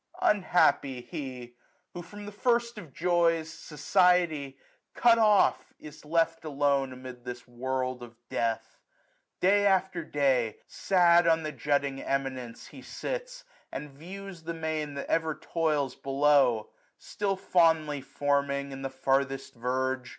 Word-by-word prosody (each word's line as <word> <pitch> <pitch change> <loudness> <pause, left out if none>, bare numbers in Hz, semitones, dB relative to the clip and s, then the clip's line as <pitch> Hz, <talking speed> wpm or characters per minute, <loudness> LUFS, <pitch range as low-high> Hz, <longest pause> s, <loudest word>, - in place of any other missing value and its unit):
Unhappy 175 -9 +2
he! 130 -5 -7 0.4
who 175 - -6
from 205 +4 -10
the 205 - -7
first 235 +1 0
of 165 -8 -12
joys. 165 -1 +1
Society, 160 -3 +1 0.4
cut 235 -1 +5
off, 210 -3 +3
is 150 0 -12
left 165 +1 0
alone 140 -2 +1
940 130 0 -10 0.2
Amid - - -29
this 125 0 -8
world 130 +1 -3
of 120 -1 -11
death. 115 -1 -2 0.6
Day 205 +2 +4
after 190 -3 +1
day. 130 -7 +1
Sad 175 -2 +3
on 165 -1 +3
the 155 - -3
jutting 140 0 -1
eminence 130 -4 -3
he - - -12
sits. - - -6 0.3
And 150 -1 -6
views 185 +5 -9
the 165 +1 -5
main 155 -2 -3
that 140 - -4
ever 160 -2 0
toils 150 -5 -1
below; 135 -5 +2 0.3
Still 200 -1 -2
fondly 160 -6 +2
forming 140 0 -1
in 135 0 -7
the 135 - -3
farthest 135 +1 -1
verge. 130 +1 -2
150 Hz, 135 wpm, -28 LUFS, 135-175 Hz, 0.6 s, cut